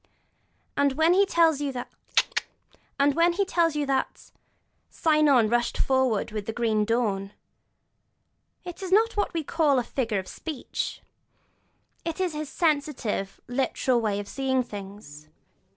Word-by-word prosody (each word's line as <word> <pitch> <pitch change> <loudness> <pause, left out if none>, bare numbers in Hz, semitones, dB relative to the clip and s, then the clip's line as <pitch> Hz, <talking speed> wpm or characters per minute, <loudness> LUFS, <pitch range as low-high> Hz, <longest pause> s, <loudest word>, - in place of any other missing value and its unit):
And 280 -1 +2
when 320 +5 +4
he 395 +2 +4
tells 325 -5 +3
you 285 -1 -1
that 245 -1 -6 3.0
'Cynon 300 -7 +3
rushed 240 +2 0
forward 260 -6 +1
with 210 -2 -5
the - - -1
green 220 -3 +1
dawn,' 210 -4 -1 1.3
it 355 0 -8
is 375 -1 -5
not 445 +4 +4
what 410 - 0
we 325 - -1
call 300 -2 +2
a 250 - +2
figure 230 -4 -2
of 190 -1 -4
speech: 310 -6 -5 1.0
it 330 +1 -4
is 365 -3 0
his 300 -1 -5
sensitive, 285 - -1
literal 250 -1 0
way 205 -2 0
of 205 - -6
seeing 265 -1 0
things. 195 -9 -10
260 Hz, 120 wpm, -26 LUFS, 215-310 Hz, 3.0 s, when